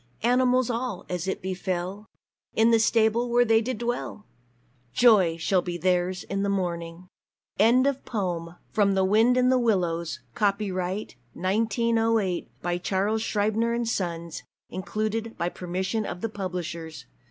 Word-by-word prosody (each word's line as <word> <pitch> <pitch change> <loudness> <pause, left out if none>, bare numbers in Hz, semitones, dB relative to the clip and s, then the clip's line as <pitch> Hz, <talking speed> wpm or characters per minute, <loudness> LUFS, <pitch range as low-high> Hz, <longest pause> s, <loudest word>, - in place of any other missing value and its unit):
Animals 250 +1 +3
all, 235 -5 -3
as 180 0 -3
it 190 - -3
befell, 185 +2 -3 0.5
In 225 +1 +4
the 230 - +5
stable 225 +1 +2
where 240 +1 +4
they 225 -1 +4
did 250 +1 -3
dwell! 235 -2 -4 0.7
Joy 200 -9 +5
shall 180 +2 +1
be 175 -1 -4
theirs 180 0 0
in 195 0 -3
the 200 - 0
morning!" 175 -2 -3 0.5
Kenneth 255 +5 +4
Grahame 175 -6 -3 0.2
_From 200 -2 +3
"The 190 0 +3
Wind 225 +6 +4
in 255 0 +4
the 255 0 +4
Willows"; 175 - 0
Copyright, 195 - -1 0.2
1908, 225 - +1
by 175 0 -1
Charles 200 +4 0
Scribner's 225 +3 0
Sons. 170 -4 -3 0.3
Included 215 +4 -3
by 170 +1 -1
permission 190 +5 -3
of 180 - -6
the 225 - -2
publishers. 170 -7 -5
200 Hz, 135 wpm, -26 LUFS, 180-225 Hz, 0.7 s, the